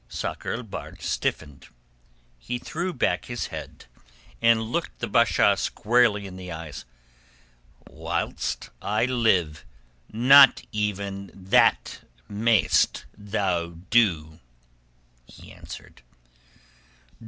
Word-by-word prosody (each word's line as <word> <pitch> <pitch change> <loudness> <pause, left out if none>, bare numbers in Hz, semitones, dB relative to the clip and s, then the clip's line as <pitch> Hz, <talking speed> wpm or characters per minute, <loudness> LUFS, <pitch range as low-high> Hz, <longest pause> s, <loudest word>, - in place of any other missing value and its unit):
Sakr - - -4
el 125 - -5
Bahr 110 - -8
stiffened. 75 -3 -3 0.7
He 120 - -4
threw 175 +8 -4
back 130 - -1
his 120 -1 -5
head - - -9 0.6
and 115 -1 +4
looked 110 +2 -4
the - - -3
Basha - - +3
squarely 115 -3 +1
in 95 -1 -9
the 90 -1 -8
eyes. 80 -6 -8 1.0
"Whilst - - -4
I 105 +3 0
live, 110 -11 +1 0.5
not 135 +4 +7
even 100 -2 -3
that 95 0 +2 0.3
mayest 105 -2 +2
thou 95 -5 -2 0.2
do," 85 -9 +2 0.9
he - - -15
answered. - - -12
105 Hz, 95 wpm, -25 LUFS, 90-115 Hz, 1.0 s, not